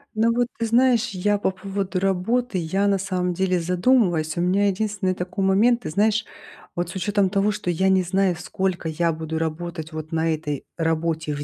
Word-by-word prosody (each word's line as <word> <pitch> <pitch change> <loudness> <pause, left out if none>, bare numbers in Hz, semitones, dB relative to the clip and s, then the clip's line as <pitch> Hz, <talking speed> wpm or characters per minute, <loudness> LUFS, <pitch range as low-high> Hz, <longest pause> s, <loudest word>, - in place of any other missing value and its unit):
Ну 225 +2 +3
вот 240 +1 +1
ты 230 - 0
знаешь, 240 0 +3
я 205 0 0
по - - +1
поводу 195 0 -3
работы 195 +4 0
я, 190 +5 0
на 200 -1 +2
самом 180 -2 -1
деле, 185 0 +1
задумываюсь. 175 -3 +2
У - - +1
меня 190 +3 +2
единственный 200 -1 -1
такой 180 +2 -3
момент. 220 +6 +3
Ты - - -5
знаешь, 215 +5 +1 0.5
вот 175 0 -2
с 175 - -8
учётом 200 0 +1
того, 200 +1 +2
что 180 -3 -2
я 190 +3 +1
не 190 -1 +3
знаю, 185 +1 +1
сколько 180 0 -2
я 165 +1 0
буду 160 0 -4
работать 160 0 -4
вот 155 0 -7
на 165 0 +1
этой 150 -2 -4
работе 160 -1 -1
в 145 0 -4
185 Hz, 195 wpm, -23 LUFS, 170-205 Hz, 0.5 s, Ну